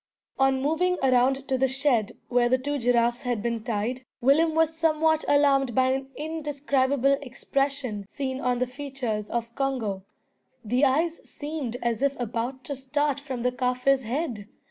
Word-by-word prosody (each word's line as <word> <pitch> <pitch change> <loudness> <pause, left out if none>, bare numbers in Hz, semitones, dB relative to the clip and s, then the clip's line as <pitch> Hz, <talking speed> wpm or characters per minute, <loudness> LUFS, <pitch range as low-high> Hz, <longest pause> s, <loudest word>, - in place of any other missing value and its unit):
On 270 0 +3
moving 360 +5 +1
around 265 +1 +3
to 260 -1 0
the 265 - +4
shed 260 -5 +1
where 240 -1 +2
the 255 - +4
two 285 +2 -2
giraffes 240 0 +2
had 240 -4 -2
been 235 -2 -2
tied, 235 +3 -2 0.2
Willem 310 +5 +3
was 320 0 +2
somewhat 320 -1 +2
alarmed 275 -4 +3
by 260 0 +4
an 270 0 -2
indescribable 280 -3 0
expression 270 -4 -2
seen 265 +1 -4
on 250 -1 +1
the 255 - +1
features 250 -5 -4
of 235 0 -3
Congo. 235 -8 -2 0.6
The 250 +6 +3
eyes 320 +5 +1
seemed 290 -5 -5
as 235 0 0
if 280 -1 +1
about 245 +3 -3
to 280 - -4
start 285 +2 -1
from 265 -4 -5
the 250 - +2
Kaffir's 250 +2 +1
head! 240 -4 -3
265 Hz, 160 wpm, -26 LUFS, 245-285 Hz, 0.6 s, the